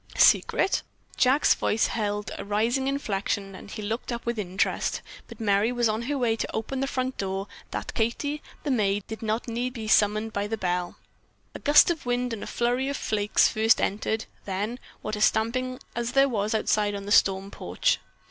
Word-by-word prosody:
"Secret?" 390 - +4 0.3
Jack's 260 +3 +4
voice 220 - +1
held 205 -2 -2
a - - -4
rising 230 +6 0
inflection 200 -7 -2
and 190 - -11
he 215 - -6
looked 225 +4 -3
up 235 0 -4
with 235 -1 -1
interest, 190 -1 -1 0.2
but - - -12
Merry 210 +1 +2
was 240 -1 +2
on 215 +1 -1
her 280 +4 -2
way 235 -4 +2
to - - -3
open 240 +4 -3
the 270 - 0
front 260 -1 -2
door 195 0 -2 0.2
that - - -5
Katie, 285 +6 -1 0.2
the 290 - -1
maid, 205 -4 +1
need 220 - -7
not 220 +1 -1
be 235 -1 -3
summoned 215 +1 +3
by 200 0 -1
the 225 +1 -2
bell. 180 -2 -2 0.6
A - - -7
gust 295 +3 +6
of 320 -7 -5
wind 245 0 0
and 220 - -5
a - - -6
flurry 245 +3 0
of 280 - -2
flakes 210 -1 +2
first 220 +1 +3
entered, 220 +2 -1 0.2
then, 205 +5 -3 0.2
what 215 - -2
a 210 - -5
stamping 255 +4 +1 0.2
as 235 +1 -2
there 275 0 +5
was 215 -3 -1
outside 210 -1 +1
on 200 0 -6
the 205 - -5
storm 195 -1 +3
porch. - - 0
220 Hz, 190 wpm, -26 LUFS, 205-250 Hz, 0.6 s, gust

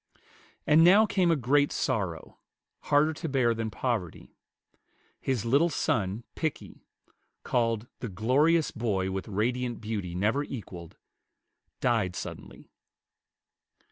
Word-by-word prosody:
And 155 +2 +6
now 200 +6 +7
came 185 -4 +1
a 165 - +4
great 140 +2 +2
sorrow, 85 -7 -3 0.5
harder 150 +2 +3
to 160 +1 -5
bear 130 -4 +2
than 115 -1 -3
poverty. 105 -6 -4 0.9
His 125 -5 -2
little 140 +8 +3
son 110 - -1
Pickie, 160 -3 -5 0.6
called 115 -2 0
"the 120 - -5
glorious 145 - +2
boy 100 -5 -1
with 95 0 -4
radiant 120 +4 -1
beauty 105 -6 -4
never 110 +10 +1
equalled," 90 - -9 0.8
died 110 -7 +1
suddenly. - - -9
120 Hz, 110 wpm, -28 LUFS, 105-145 Hz, 0.9 s, now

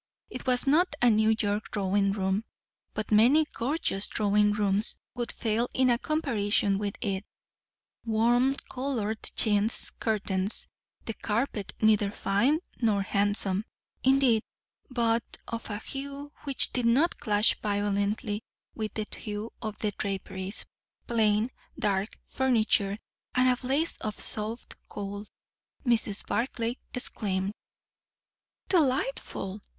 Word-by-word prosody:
It 250 - -7
was 250 +1 +3
not 305 +3 +3
a 245 -1 +5
New 220 +1 +4
York 205 0 -1
drawing 195 0 +1
room; 195 +1 0 0.5
but 215 0 -3
many 250 +9 +6
gorgeous 240 -6 -1
drawing 210 0 +2
rooms 205 0 0 0.2
would 240 -1 -3
fail 230 +1 -1
in 255 -1 +4
a 235 - +2
comparison 210 -10 +1
with 205 -1 -3
it. 195 -3 -1 0.8
Warm 240 +4 +3 0.2
coloured 240 -5 -2
chintz 210 +1 +2
curtains; 200 -2 +1 0.4
the 225 - -3
carpet 215 -1 -2
neither 215 -2 +4
fine 235 - +1 0.2
nor 210 -4 +2
handsome, 200 0 +1 0.4
indeed, 265 -4 +4 0.5
but 235 -2 +1 0.2
of 230 -1 -5
a 205 - -2
hue 280 +5 -6
which 275 -2 +1
did 245 -2 +1
not 280 +9 +3
clash 210 0 +4
violently 205 +1 -1 0.3
with 215 -1 -4
the 215 - -2
hue 210 +1 -5
of 215 -2 -4
the 210 - -1
draperies; 195 0 -3 0.4
plain, 220 0 +2 0.3
dark 200 +1 -1
furniture; 220 -6 +2 0.4
and 255 0 +4
a 250 - +4
blaze 275 +6 -1
of 215 -1 -5
soft 220 +2 +3 0.2
coal. 205 +1 -6 0.6
Mrs. 225 -4 +2
Barclay 235 0 -1
exclaimed, 200 -5 -2 1.1
"Delightful! 265 - 0
220 Hz, 120 wpm, -28 LUFS, 205-245 Hz, 1.1 s, many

